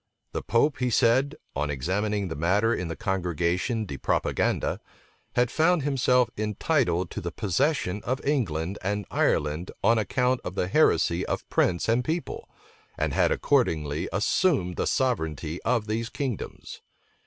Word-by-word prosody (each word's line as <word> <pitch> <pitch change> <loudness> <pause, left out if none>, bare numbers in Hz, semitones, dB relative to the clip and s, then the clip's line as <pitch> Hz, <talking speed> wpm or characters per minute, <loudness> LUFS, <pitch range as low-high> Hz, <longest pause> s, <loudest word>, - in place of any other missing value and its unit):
The - - -3
pope, 135 +5 +1
he 125 -1 +1
said, 130 +6 +3 0.2
on 75 +2 -1
examining 100 +8 -1
the 80 - -5
matter 100 +9 +2
in 90 -6 -2
the 80 - -4
congregation 90 - -1
de 70 -8 -6
propaganda, - - 0 0.6
had 120 -1 +2
found 165 0 +3
himself 125 -3 +2
entitled 105 - 0
to - - -5
the 85 - -3
possession 105 - 0
of 130 +2 -1
England 100 - -1
and 100 +2 -2
Ireland 75 +4 0
on 115 -1 +4
account 125 +3 +1
of 90 - -6
the 90 - 0
heresy 90 - +3
of - - -3
prince 85 -1 +1
and 115 +2 +2
people, 160 +5 -4 0.5
and - - -1
had - - +3
accordingly 75 -1 +1
assumed 105 - +1
the - - -1
sovereignty 80 - -1
of 120 -4 +1
these 115 +2 -2
kingdoms. 130 -7 -5
105 Hz, 145 wpm, -26 LUFS, 85-125 Hz, 0.6 s, on